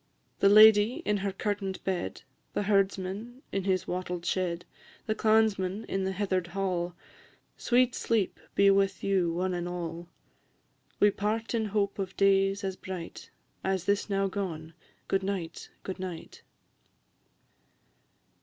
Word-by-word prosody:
The 195 - +5
lady 215 +2 +7
in 210 0 +2
her 200 0 -2
curtain'd 195 -1 -3
bed, 185 -2 -3 0.3
The - - +1
herdsman 200 +5 -1
in 195 -1 -2
his 185 -2 0
wattled 180 -1 -3
shed, 180 -2 -1 0.4
The 215 - 0
clansman 215 -2 +2
in 195 0 -2
the 190 - 0
heather'd 185 -2 -1
hall, 175 -1 -2 0.6
Sweet 250 0 +2
sleep 220 -5 0 0.2
be 200 0 +6
with 195 0 +1
you, 190 -4 +2
one 180 +2 -1
and 175 0 -3
all! 170 -1 -5 0.9
We 205 - +6
part 220 +4 -2
in 225 -2 +1
hope 200 -1 -1
of 190 -1 -4
days 195 0 +3
as 190 -1 -2
bright 185 -3 -8 0.3
As 190 -2 -1
this 200 +2 +1
now 195 0 +1
gone 170 -5 -4 0.3
Good 195 - +1
night, 190 -4 -4
good 190 -1 -5
night! 180 -3 -7
195 Hz, 135 wpm, -29 LUFS, 185-205 Hz, 0.9 s, lady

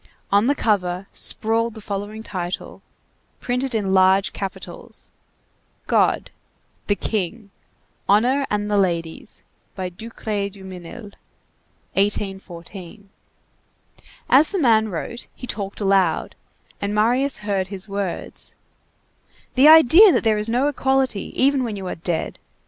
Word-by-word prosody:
On 205 +4 +4
the 285 - +3
cover 185 -6 0
sprawled 225 +1 0
the - - -8
following 205 +1 -5
title, 180 -4 -5 0.6
printed 250 0 -2
in 195 -3 0
large 190 +1 +4
capitals: 195 -2 -8 0.7
GOD; - - +1 0.6
THE 205 - +2
KING; 205 +1 -3 0.6
HONOR 250 +7 +3
AND 210 0 -1
THE 205 - +2
LADIES; 175 - -2 0.3
by 185 -2 -3
DUCRAY 210 +1 -4
DUMINIL, 190 +2 -10 0.8
1814. 195 -1 -4 1.2
As 285 +4 +5
the 400 - -2
man 225 - +3
wrote, 210 +6 -5
he - - -8
talked 200 -4 -5
aloud, 195 -5 +1 0.5
and 200 +1 -2
Marius 245 +6 +2
heard 195 -3 0
his 195 0 -6
words:— 200 -2 -5 1.0
"The 265 +3 +6
idea 320 - +9
that - - +1
there 215 -2 +2
is 210 +2 -3
no 250 +5 +2
equality, 265 -6 0
even 275 0 +3
when 225 -4 -3
you 195 -1 -6
are 180 - -3
dead! 165 0 -3
205 Hz, 120 wpm, -22 LUFS, 190-235 Hz, 1.2 s, idea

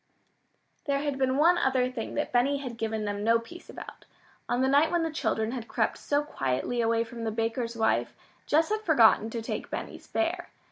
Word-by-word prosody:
There 280 -2 +1
had 285 -2 -2
been 260 0 +1
one 345 +4 +5
other 255 -4 +1
thing 235 -3 -5
that 295 - -2
Benny 255 +4 +2
had 255 -4 -6
given 220 -1 -2
them 205 0 -3
no 230 +1 +4
peace 290 +10 -11
about. - - -10 0.4
On 245 +2 +1
the - - +3
night 285 +4 +4
when 345 -1 +1
the 325 - -1
children 220 -7 -1
had 240 -3 -5
crept - - -1
so 290 0 0
quietly 185 - -2
away 230 0 +2
from 230 0 -8
the 225 - -1
baker's 230 +2 -2
wife, 220 0 +1 0.3
Jess 320 +2 +3
had 430 0 -1
forgotten 235 - +4
to 230 0 -5
take - - -4
Benny's - - -6
bear. 345 +1 -1
250 Hz, 200 wpm, -28 LUFS, 225-295 Hz, 0.4 s, one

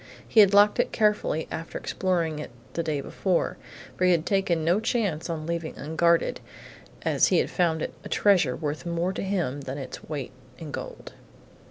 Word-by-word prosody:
He 225 - +3
had 200 -2 +8
locked 205 +3 +5
it - - +2
carefully 210 -7 +1
after 165 - -5
exploring 170 -5 -1
it 150 - -6 0.2
the 170 - -1
day 155 -3 -2
before, 185 +5 -1 0.4
for 185 - +1
he - - +5
had 170 -2 +2
taken 185 -5 +1
no 175 +5 +3
chance 205 -8 -1
on 160 -2 -3
leaving 170 -1 -3
unguarded 165 +3 +1 0.6
as - - +3
he - - +3
had - - +1
found 165 -3 +1
it - - -4 0.2
treasure 180 -11 +3
worth 150 -1 -4
more 170 +2 -1
to - - -4
him 175 -9 -1
than 135 0 -5
its 135 -3 -7
weight 145 -5 -4 0.3
in 160 -3 -8
gold. - - -7
170 Hz, 180 wpm, -26 LUFS, 155-190 Hz, 0.6 s, had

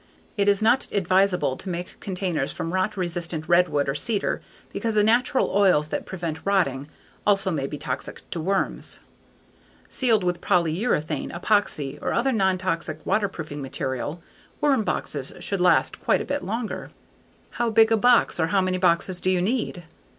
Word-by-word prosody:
It 200 -2 +1
is 205 +1 +3
not 245 +4 +3
advisable 185 -7 +2
to 190 - -7
make 175 0 -5
containers 180 -7 -2
from 165 - -4
rot 185 +1 0
resistant 170 -3 -3
redwood 175 -5 +3
or 135 - 0
cedar 205 +8 -1 0.3
because 225 -2 -2
the 210 - +4
natural 250 +6 +2
oils 185 -7 +3
that - - -3
prevent 170 -4 -5
rotting 150 -8 0 0.3
also 195 -2 +2
may 140 -5 -1
be 150 - -6
toxic - - -5
to 170 - -3
worms. 195 +4 -2 0.9
Sealed 230 -6 +2
with 175 -1 -1
polyurethane, 170 -1 0
epoxy, 170 -7 0
or - - -1
other 260 +3 +2
non 190 -5 +2
toxic 165 -4 -3
waterproofing 160 -8 -2
material, 135 +4 -4 0.4
worm 280 -6 +3
boxes 140 -9 -3
should 200 -2 -3
last 180 - +3
quite - - +2
a - - -4
bit 285 0 -2
longer. 225 +3 -4 0.6
How 240 -1 -1
big 225 0 +5
a - - +6
box 240 -3 +3
or 160 - +2
how 195 +3 +2
many 185 0 0
boxes 180 0 +1
do 185 - +1
you 185 -1 +2
need? 200 -2 -1
185 Hz, 165 wpm, -24 LUFS, 165-205 Hz, 0.9 s, a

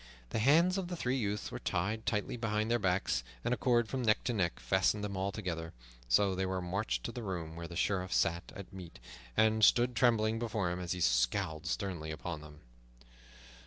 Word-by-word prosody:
The - - 0
hands 165 - +4
of 185 - -3
the 175 - -4
three 130 -6 -1
youths 105 -3 -2
were - - -5
tied 105 +6 -2
tightly 105 +2 0
behind 110 -1 -1
their 120 - +3
backs, 90 -9 +1 0.2
and - - +2
a - - -1
cord 120 -3 +2
from 130 +3 -2
neck 110 -3 +2
to 125 - 0
neck 90 -6 0
fastened 95 +2 +1
them 100 -1 -3
all 95 +1 -1
together. 85 -6 -4 0.4
So 95 +10 +4
they 95 +1 -1
were 95 0 -1
marched 95 +4 -2
to - - -3
the 120 - -6
room 85 -6 -4
where 85 0 -6
the 85 - -9
Sheriff 95 0 0
sat 85 +1 +1
at 100 -1 -9
meat, 90 -7 -9 0.4
and 110 0 +4
stood 120 +3 +5
trembling 115 -2 +3
before 105 -6 -1
him 90 - -3
as 90 -1 -2
he 90 - -5
scowled 80 +6 +1
sternly 90 -6 -3
upon 80 0 -5
them. 75 -1 -13
100 Hz, 205 wpm, -33 LUFS, 90-115 Hz, 0.4 s, stood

